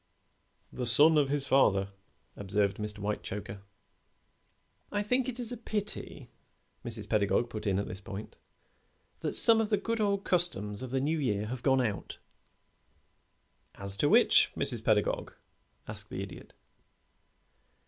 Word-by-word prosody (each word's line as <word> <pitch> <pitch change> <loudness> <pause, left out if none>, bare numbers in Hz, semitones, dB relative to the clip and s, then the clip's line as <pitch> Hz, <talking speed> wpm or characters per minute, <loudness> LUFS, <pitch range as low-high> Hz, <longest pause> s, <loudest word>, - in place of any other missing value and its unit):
"The 125 - -3
son 150 +7 +6
of 145 -3 +3
his 140 -1 -1
father," 100 -8 +3 0.5
observed 100 0 -1
Mr. 105 0 -4
Whitechoker. 100 -1 -5 1.3
"I 205 0 -1
think 250 +4 0
it 250 0 -6
is 240 -1 -3
a 245 - -5
pity," 210 -2 -5 0.5
Mrs. 110 -3 -3
Pedagog 110 +3 +1
put 110 -1 -5
in 95 -2 +1
at 100 - -2
this 95 +2 -7
point, 105 0 -8 0.8
"that - - -3
some 225 -1 +5
of 215 - -2
the 210 - +2
good 230 +1 -2
old 200 -1 +1
customs 105 - -1
of 130 - -5
the 135 +2 0
New 155 +4 0
Year 105 -7 -1
have 125 +3 -5
gone 135 -1 +3
out." 110 -5 -3 1.6
"As 100 0 -1
to 145 - +2
which, 235 +2 +5
Mrs. - - +1
Pedagog?" - - +1 0.5
asked - - -9
the - - -4
Idiot. - - -11
125 Hz, 145 wpm, -30 LUFS, -, 1.6 s, son